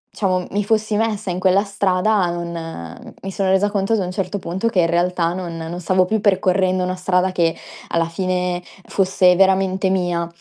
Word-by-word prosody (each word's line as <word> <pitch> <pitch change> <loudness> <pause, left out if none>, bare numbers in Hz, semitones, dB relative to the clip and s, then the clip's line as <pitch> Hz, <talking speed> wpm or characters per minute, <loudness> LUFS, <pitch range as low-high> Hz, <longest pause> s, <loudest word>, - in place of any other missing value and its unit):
diciamo, 185 -3 0
mi 205 +1 0
fossi 215 0 0
messa 215 -2 -1
in 175 - -3
quella 190 +1 +3
strada, 200 0 +1
non 165 - -7
mi 195 - -5
sono 190 0 -1
resa 190 +2 +3
conto 200 +1 0
ad 220 - +2
un 180 -2 -2
certo 195 +1 -3
punto 185 +6 -2
che 200 - +1
in 165 - +2
realtà 170 0 +1
non 175 -2 -5
non 165 +2 -5
stavo 185 +1 +2
più 215 +3 -1
percorrendo 185 -2 +2
una 185 0 -2
strada 180 0 +1
che 170 -2 +1 0.3
alla 165 0 +1
fine 180 +1 -2 0.3
fosse 185 -2 +3
veramente 190 0 +2
mia. 175 -2 0
185 Hz, 185 wpm, -20 LUFS, 180-195 Hz, 0.3 s, quella